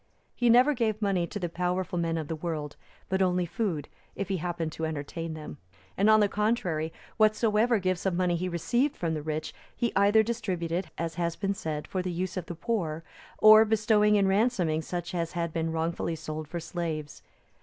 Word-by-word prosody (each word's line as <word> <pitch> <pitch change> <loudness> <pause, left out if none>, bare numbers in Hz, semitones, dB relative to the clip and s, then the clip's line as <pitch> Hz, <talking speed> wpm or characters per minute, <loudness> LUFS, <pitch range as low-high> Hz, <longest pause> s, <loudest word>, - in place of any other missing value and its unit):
He 245 -1 +1
never 250 +5 +6
gave 220 -4 0
money 195 -5 +1
to 205 - -6
the 180 -3 -2
powerful 180 +1 -2
men 165 -1 0
of 155 -2 -4
the 160 - -3
world, 155 -2 -4 0.3
but 190 0 0
only 180 -1 +2
food, 170 - -2 0.3
if 195 -1 -4
he 190 - 0
happened 170 -1 -3
to 160 - -3
entertain 160 +2 -5
them; 155 -1 -8 0.4
and, 200 +3 +3
on 215 0 +6
the 205 - +4
contrary, 195 -7 0 0.3
whatsoever 215 +1 +3
gifts 185 -1 -1
of 185 - 0
money 180 -1 +1
he 180 +2 -2
received 240 - 0
from 165 -2 -1
the 155 - -3
rich, 155 +1 -4 0.2
he 235 - 0
either 205 +2 +5
distributed, 185 -6 -2
as 165 0 -2
has 170 -1 0
been 200 -1 -1
said, 155 -5 -4
for 185 - -2
the 180 - -3
use 180 +2 -3
of 180 -3 -4
the 175 - -5
poor, 165 -6 -2 0.3
or 215 0 +9
bestowed 210 -1 +3
in 200 -2 +3
ransoming 190 -6 +2
such 175 +1 -5
as 170 -2 -2
had 170 -2 -2
been 165 -1 -1
wrongfully 165 +1 -1
sold 155 -1 -6
for 170 +3 -4
slaves. 160 -3 -4
180 Hz, 195 wpm, -28 LUFS, 165-210 Hz, 0.4 s, or